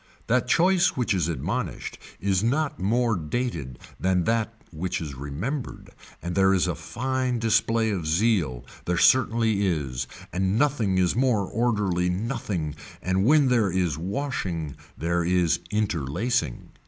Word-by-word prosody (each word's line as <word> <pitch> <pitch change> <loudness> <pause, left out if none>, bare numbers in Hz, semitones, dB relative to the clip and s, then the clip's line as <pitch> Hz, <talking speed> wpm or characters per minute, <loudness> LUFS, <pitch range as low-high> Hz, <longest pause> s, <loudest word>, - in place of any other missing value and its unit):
That 125 +1 +1
choice 175 +5 +3
which 125 -4 +1
is 90 -5 +1
admonished 85 - -3 0.2
is 95 0 +1
not 140 +6 0
more 115 +4 +2
dated 80 - -3 0.2
than 90 -1 +2
that 115 +3 +1 0.2
which 90 +2 -3
is 75 -5 -5
remembered 75 - -5 0.3
and 85 +1 -3
there 95 0 +4
is 90 - +2
a - - 0
fine 130 0 -2
display 115 0 +2
of 90 -6 -2
zeal 80 - +1 0.2
there 90 0 0
certainly 115 -4 +3
is 70 -7 -2 0.3
and 95 +3 +1
nothing 120 -9 +2
is 90 -2 +2
more 120 -5 +2
orderly 100 -6 0
nothing 95 - -2 0.3
and 95 +2 +1
when 145 0 +5
there 115 -5 +3
is 90 -5 0
washing 90 - -3 0.2
there 85 +1 0
is 85 -1 +2
interlacing. 100 - -1
95 Hz, 140 wpm, -25 LUFS, 85-120 Hz, 0.3 s, when